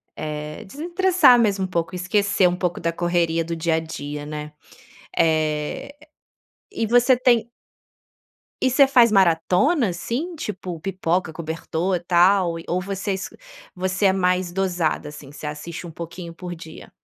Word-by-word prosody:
eh, 150 +3 -5
desestressar 345 - +4
mesmo 200 -4 +2
um - - -4
pouco, 170 0 -2
esquecer 195 +1 +2
um 175 - 0
pouco 180 -1 -2
da 170 - -1
correria 170 -1 +1
do 170 +1 -4
dia 165 0 0
a - - +1
dia, 150 -2 -6
né. 150 0 -6 0.6
Eh, 155 - 0 0.8
e 225 - -1
você 245 +2 +5
tem 240 -2 +3 1.1
E 260 - +3
você 270 +2 +5
faz 240 -4 +5
maratonas, 190 - +3
assim, 300 - -3
tipo 185 - -6
pipoca, 180 -2 -1
cobertor 165 +3 -2
e - - -7
tal. 175 0 +3
E, - - -10
ou 180 - +1
você 195 +1 -3
es 190 - -4 0.5
você 185 +2 -1
é 190 - +5
mais 180 -1 +1
dosada, 175 -5 -1
assim, 145 -2 -11
você 150 - -10
assiste 155 +4 -6
um 170 - -8
pouquinho 170 +1 -8
por 175 0 -7
dia? 160 -1 -11
180 Hz, 155 wpm, -22 LUFS, 165-200 Hz, 1.1 s, você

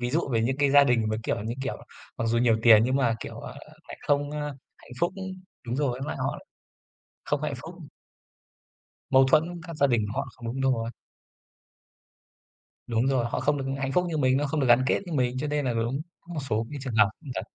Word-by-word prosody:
ví 120 0 -1
dụ 155 +1 0
về 115 - +2
những 130 +4 0
cái 140 -1 +2
gia 140 0 +7
đình 120 -4 +2
mà, 110 - 0
kiểu, 100 - -1
như 115 +2 -3
kiểu, 135 - -3 0.4
mặc 115 - -1
dù 115 +1 +2
nhiều 115 -2 +4
tiền 110 -2 +8
nhưng 130 +2 +1
mà, 120 -4 +2
kiểu, - - -7
à, - - -8 0.4
lại - - -8
không, 145 0 +2
ơ, 150 0 -4 0.4
hạnh 125 - -16
phúc 175 +2 +2 0.5
đúng 120 +2 -2
rồi, 140 -3 +1
với 125 - -5
lại - - -3
họ - - -2 0.9
không - - -1
có - - -2
hạnh - - -2
phúc. - - -9 1.4
Mâu 135 0 +6
thuẫn 170 +3 +2
các 170 -2 -7
gia 140 - +4
đình 115 -5 +1
họ 140 +1 -2
không 120 - -15 0.2
đúng 135 -1 +3
rồi. 115 0 -3 2.0
Đúng 120 +1 +1
rồi, 130 -3 +2
họ 120 - -2
không 145 +2 +2
được 135 - -3
hạnh 135 0 -2
phúc 180 +4 +2
như 160 - -2
mình, 130 -3 +3
nó 145 +1 +1
không 150 +2 -1
được 135 - +2
gắn 120 +1 +6
kết - - +2
như 170 - -6
mình, 125 -3 +1
cho 150 - -2
nên 145 -1 -1
là 125 - +1
đúng, 115 +5 -1 0.2
có 175 0 -10
một 150 - -2
số 110 +2 0
cái 145 - -5
trường 130 -4 -4
hợp 105 -2 +5
cũng 150 - -12
thật. - - -1
130 Hz, 240 wpm, -27 LUFS, 120-145 Hz, 2.0 s, tiền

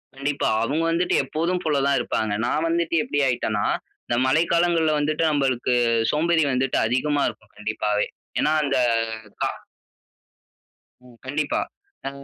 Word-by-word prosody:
கண்டிப்பா. 140 -2 -1
அவுங்க 150 +7 0
வந்துட்டு 175 +2 +1
எப்போதும் 170 +6 -1
போல 145 -3 +1
தான் 140 - +3
இருப்பாங்க. 110 -2 -1
நான் 155 +6 0
வந்துட்டு, 170 0 0
எப்படி 145 - -2
ஆயிட்டேனா, 110 -4 0 0.4
இந்த 120 - 0
மழை 155 +6 +3
காலங்கள்ல 170 -2 +3
வந்துட்டு, 155 +2 0
நம்பளுக்கு 130 -3 +1 0.4
சோம்பேறி 160 +1 +2
வந்துட்டு 130 +1 0
அதிகமா 140 +5 +1
இருக்கும், 105 - -15
கண்டிப்பாவே. 105 0 -1 0.3
ஏனா, 150 - +2
அந்த 140 -2 +1 0.7
கா - - +1 1.6
ம். 120 -2 -17
கண்டிப்பா. 145 +2 -1 0.5
அ - - 0
145 Hz, 130 wpm, -23 LUFS, 125-160 Hz, 1.6 s, தான்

